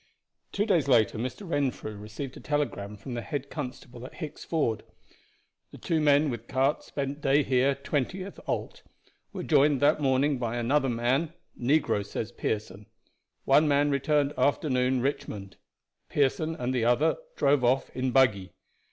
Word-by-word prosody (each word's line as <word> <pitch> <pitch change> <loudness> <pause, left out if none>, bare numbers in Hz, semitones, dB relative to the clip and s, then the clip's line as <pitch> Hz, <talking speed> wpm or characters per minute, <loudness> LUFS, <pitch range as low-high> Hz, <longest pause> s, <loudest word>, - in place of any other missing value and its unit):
Two 205 - 0
days 175 -10 +2
later 115 -4 +3
Mr. 130 - -5
Renfrew 135 -8 -2
received 110 +6 -7
a - - -9
telegram 145 -9 -2
from 125 +5 -8
the 120 - -3
head 140 +1 -5
constable 125 -4 -7
at 130 - -10
Hicks 155 -5 -7
Ford: 115 -10 0 0.9
"The - - -12
two 160 -2 -1
men 145 0 +4
with 120 -1 -7
cart 135 +2 +1
spent 140 +1 -4
day 140 +1 +3
here, 130 +1 +2
20th 150 +8 -3
ult. - - -3 0.5
Were - - -5
joined 145 -2 +3
that 150 +1 +3
morning 135 0 +2
by 120 -1 -2
another 135 +4 +1
man 130 +7 0 0.2
negro 140 -4 +1
says 110 +3 -5
Pearson. 105 -3 -4 0.6
One 150 +3 +5
man 145 0 +3
returned 145 +1 +1
afternoon, 130 -2 +1
Richmond. 105 -7 -4 0.5
Pearson 155 +3 +1
and 125 -1 -2
the 125 -3 0
other 120 +7 +3 0.2
drove 140 -2 +2
off 130 +2 +2
in 130 0 0
buggy. 110 -8 +2
135 Hz, 150 wpm, -28 LUFS, 120-145 Hz, 0.9 s, One